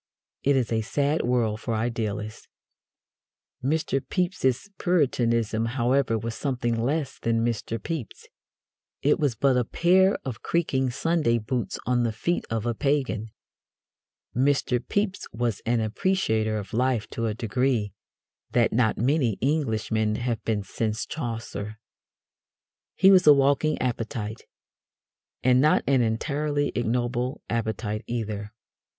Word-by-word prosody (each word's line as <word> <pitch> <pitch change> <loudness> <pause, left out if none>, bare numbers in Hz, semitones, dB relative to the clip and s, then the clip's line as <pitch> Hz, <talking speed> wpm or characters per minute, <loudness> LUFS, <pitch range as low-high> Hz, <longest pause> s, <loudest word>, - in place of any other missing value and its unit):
It 140 0 +3
is 125 -4 0
a 110 -1 +1
sad 145 +7 0
world 120 -3 +1
for 115 - -2
idealists. 110 -2 -3 1.2
Mr. 140 -1 +1
Pepys's 180 -3 0
Puritanism, 115 - +1
however, 125 -1 +2
was 115 +1 -4
something 120 -3 -1
less 135 +5 -1
than 115 0 +1
Mr. 115 -1 -2
Pepys. 125 0 -6 0.8
It 145 +2 +3
was 140 -6 +1
but 130 +3 +3
a 125 - +3
pair 185 - +3
of 125 -4 -5
creaking 135 -6 0
Sunday 150 -2 +1
boots 115 +2 -2
on 125 -1 +2
the 115 -1 +1
feet 170 +11 -1
of 115 0 -2
a 120 - +1
pagan. 130 -5 -1 1.1
Mr. 130 -1 +2
Pepys 205 -1 -1
was 115 -2 -2
an 120 -1 +2
appreciator 110 - 0
of 100 -2 -7
life 125 -1 +1
to 115 -1 -2
a 105 - -2
degree 115 -2 0 0.6
that 120 -2 +3
not 110 -1 +2
many 125 -3 +1
Englishmen 110 -6 0
have 120 0 -2
been 105 -3 -1
since 110 +2 -2
Chaucer. 115 -6 -5 1.2
He 195 0 +6
was 185 -4 +5
a 150 - +11
walking 140 +2 +2
appetite. 115 -3 -3 1.0
And 125 0 +5
not 155 +2 +4
an 135 -2 +3
entirely 145 +5 0
ignoble 120 +1 -1
appetite 110 -1 -2
either. 105 -3 -3
120 Hz, 130 wpm, -26 LUFS, 110-140 Hz, 1.2 s, a